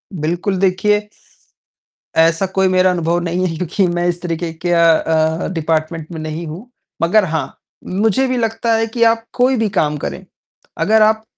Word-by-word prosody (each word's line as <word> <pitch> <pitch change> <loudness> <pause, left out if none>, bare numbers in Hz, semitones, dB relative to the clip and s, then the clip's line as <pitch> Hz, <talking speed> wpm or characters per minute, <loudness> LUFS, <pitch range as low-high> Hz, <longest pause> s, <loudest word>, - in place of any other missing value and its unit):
बिल्कुल, 175 +5 -1
देखिए 210 +2 +1 1.1
ऐसा 165 +3 +3
कोई 190 0 +3
मेरा 185 0 +3
अनुभव 170 0 0
नहीं 180 +2 -1
है 165 - -4
क्योंकि 180 +2 0
मैं 175 0 -1
इस 175 0 -2
तरीके 170 -1 -3
के 175 - +1
अ 170 -1 +4
अ, 160 0 +2
डिपार्टमेंट 160 0 -2
में 160 - -6
नहीं 155 +2 -5
हूँ। 185 +11 -9 0.3
मगर 190 +5 +3
हाँ, 160 -2 -4 0.3
मुझे 220 +7 +1
भी 255 -1 -1
लगता 225 0 0
है 225 0 0
कि 230 +1 0
आप 230 0 +2
कोई 255 +1 +2
भी 220 -2 0
काम 150 -6 0
करें, - - -6 0.5
अगर 215 +7 +3
आप 220 0 +3
180 Hz, 175 wpm, -17 LUFS, 165-215 Hz, 1.1 s, अ